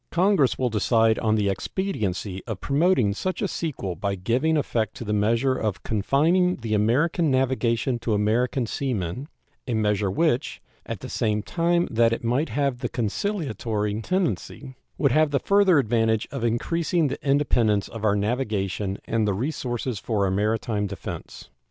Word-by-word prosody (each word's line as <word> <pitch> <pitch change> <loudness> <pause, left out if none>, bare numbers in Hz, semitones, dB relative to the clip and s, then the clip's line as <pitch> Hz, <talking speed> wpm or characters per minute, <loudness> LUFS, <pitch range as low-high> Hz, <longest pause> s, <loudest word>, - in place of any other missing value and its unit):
Congress 180 -6 +2
will 125 -2 0
decide 110 +1 +2
on 110 -1 +1
the 105 -2 +1
expediency 100 - -2
of 110 -5 -4
promoting 140 - +2
such 185 - -3
a 205 - 0
sequel 135 - -4
by 100 +4 -2
giving 125 - +1
effect 115 -6 -1
to - - -6
the 105 -2 -2
measure 115 +5 +2
of 110 -6 -3
confining 160 - +2
the 115 -3 -4
American 145 +10 +2
navigation 130 -2 +1
to 115 -2 0
American 120 +5 +1
sea 130 +2 -2
men 95 - -4 0.4
a 120 - -1
measure 105 -2 +1
which, 150 - 0 0.3
at - - -5
the - - -6
same 105 -1 -1
time 170 +3 +1
that 115 0 +3
it 115 - -4
might 125 +7 0
have 140 -3 -1
that - - -4
conciliatory 110 - -2
tendency, 165 - -2 0.2
would 140 -4 +2
have 155 +3 +3
the 140 -1 +1
further 200 -1 +4
advantage 115 -3 +1
of 135 -4 -4
increasing 160 +8 +1
the - - -5
independence 120 -7 +2
of 115 -2 -8
our 105 -2 +3
navigation 105 -3 -1
and 115 -2 0
the 100 - +1
resources 125 -2 -3
for 105 -2 0
our 95 - 0
maritime 105 +1 0
defense. 100 0 -8
115 Hz, 165 wpm, -24 LUFS, 105-145 Hz, 0.4 s, further